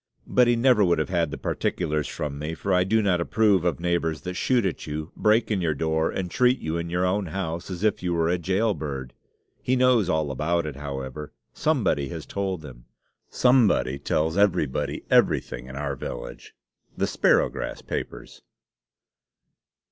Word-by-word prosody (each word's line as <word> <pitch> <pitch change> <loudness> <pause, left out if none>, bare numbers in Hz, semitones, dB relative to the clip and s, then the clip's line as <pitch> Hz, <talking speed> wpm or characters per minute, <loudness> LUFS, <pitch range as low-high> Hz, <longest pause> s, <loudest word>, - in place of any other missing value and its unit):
But 125 -1 +3
he 120 - +4
never 120 -2 +4
would 85 -2 +3
have 80 - -1
had 85 -3 +1
the - - -6
particulars 75 -1 -1
from 70 -1 -5
me, 75 +2 -4
for 95 +3 -2
I 90 0 +4
do 110 +4 +2
not 90 -4 +2
approve 100 0 +2
of 90 -2 0
neighbors 85 -3 -1
that 90 - -5
shoot 120 +4 +1
at 90 - -3
you, 75 +2 -5
break 110 +2 +2
in 100 -3 +1
your 80 -3 0
door, 80 +2 0
and 90 -2 -4
treat 125 +1 +3
you, 80 -5 -4
in 85 0 -3
your 90 +2 0
own 95 +1 0
house, 85 -1 -4
as 90 +1 -5
if 110 -2 +1
you 90 -1 -1
were 80 -1 +1
a 90 +1 +1
jailbird. 85 - -2 0.5
He 130 - +1
knows 125 -6 +3
all 80 -4 0
about 85 +5 0
it, 75 -3 -5
however 70 0 -6 0.2
somebody 110 - 0
has - - -6
told 95 -5 -3
him - - -12 0.4
somebody 115 - +3
tells 80 +4 0
everybody 90 -9 0
everything 60 +1 +2
in 65 - -9
our 70 0 -3
village. - - -8 0.4
_The - - +1
Sparrowgrass - - +1
Papers. - - -6
85 Hz, 175 wpm, -25 LUFS, 75-100 Hz, 0.5 s, he